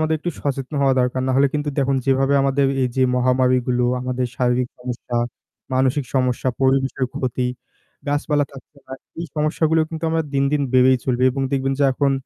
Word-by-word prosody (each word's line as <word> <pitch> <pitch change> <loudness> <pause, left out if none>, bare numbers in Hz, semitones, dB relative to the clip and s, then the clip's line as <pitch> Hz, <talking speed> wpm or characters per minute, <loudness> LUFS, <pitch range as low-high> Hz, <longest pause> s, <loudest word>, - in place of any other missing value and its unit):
আমাদের 155 0 +1
একটু 175 - -3
সচেতন 135 0 -3
হওয়া 135 -1 +3
দরকার। 125 +1 0
নাহলে 135 +2 +4
কিন্তু 150 0 -1
দেখুন 135 0 +2
যেভাবে 135 +1 +2
আমাদের 140 0 +2 0.2
এই 125 - +2
যে 130 - +3
মহামারিগুলো 125 -1 +2 0.2
আমাদের 125 0 -2
শারীরিক 125 0 +1
সমস্যা, 125 -1 -5 0.6
মানসিক 130 +2 +1
সমস্যা, 130 -1 +1
পরিবেশের 135 0 +1
ক্ষতি, 125 -1 -1 0.6
গাছপালা 145 0 +1
থাকছে 140 +1 -14
না, 130 - -10 0.3
এই 170 - -4
সমস্যাগুলো 155 +1 +1
কিন্তু 160 0 -5
আমরা 165 0 +1
দিন, 135 0 +2
দিন, 150 -1 +1
বেড়েই 130 0 +6
চলবে। 125 -1 +1
এবং 135 +1 -3
দেখবেন 135 0 0
যে 140 - +5
এখন 140 +1 +1
135 Hz, 170 wpm, -21 LUFS, 125-140 Hz, 0.6 s, বেড়েই